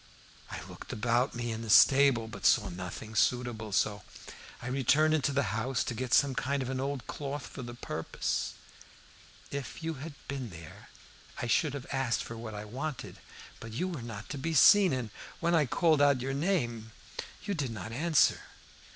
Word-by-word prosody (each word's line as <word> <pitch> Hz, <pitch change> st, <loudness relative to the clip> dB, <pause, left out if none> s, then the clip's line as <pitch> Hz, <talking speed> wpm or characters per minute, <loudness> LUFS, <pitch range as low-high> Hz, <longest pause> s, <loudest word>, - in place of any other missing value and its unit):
I -, -, -6 dB
looked -, -, -10 dB
about 120 Hz, +4 st, +1 dB
me 120 Hz, -1 st, -3 dB
in 110 Hz, 0 st, -4 dB
the 115 Hz, -, -6 dB
stable, 130 Hz, 0 st, +6 dB
but 110 Hz, -, -9 dB
saw 105 Hz, -5 st, +4 dB
nothing 90 Hz, +5 st, -7 dB
suitable, 115 Hz, -1 st, 0 dB
so 105 Hz, +1 st, +1 dB, 0.6 s
I -, -, -10 dB
returned 140 Hz, +5 st, +3 dB
into 145 Hz, -3 st, +2 dB
the 135 Hz, -8 st, 0 dB
house 130 Hz, -1 st, 0 dB
to 130 Hz, -, -3 dB
get 125 Hz, +1 st, -4 dB
some 140 Hz, -2 st, +4 dB
kind 135 Hz, +2 st, -1 dB
of 130 Hz, -, -4 dB
an 130 Hz, -, -2 dB
old 135 Hz, -2 st, -3 dB
cloth 140 Hz, -2 st, -5 dB
for -, -, -8 dB
the 120 Hz, -1 st, -7 dB
purpose. 80 Hz, -8 st, -3 dB, 1.0 s
If 140 Hz, +3 st, -6 dB
you 165 Hz, 0 st, -1 dB
had 155 Hz, -1 st, -7 dB
been 135 Hz, -4 st, -4 dB
there 85 Hz, -3 st, -12 dB, 0.5 s
I -, -, -2 dB
should 145 Hz, +4 st, +2 dB
have 135 Hz, -2 st, -6 dB
asked 135 Hz, -4 st, 0 dB
for 115 Hz, -, -7 dB
what 115 Hz, -2 st, -7 dB
I 105 Hz, +1 st, -6 dB
wanted, 130 Hz, +6 st, -5 dB, 0.4 s
but 115 Hz, -1 st, -9 dB
you 180 Hz, +11 st, -1 dB
were 170 Hz, -8 st, -5 dB
not 115 Hz, -1 st, -7 dB
to 145 Hz, -, -4 dB
be 160 Hz, +4 st, -2 dB
seen, 195 Hz, +4 st, +7 dB
and 125 Hz, -5 st, -2 dB, 0.3 s
when 170 Hz, 0 st, +1 dB
I 155 Hz, -5 st, +4 dB
called 155 Hz, +2 st, +3 dB
out 140 Hz, -2 st, +5 dB
your 135 Hz, +2 st, -2 dB
name 120 Hz, -, -1 dB, 0.5 s
you 200 Hz, -, -2 dB
did 145 Hz, -8 st, -2 dB
not 110 Hz, -2 st, -6 dB
answer. 155 Hz, +5 st, +3 dB
130 Hz, 185 wpm, -30 LUFS, 115-145 Hz, 1.0 s, seen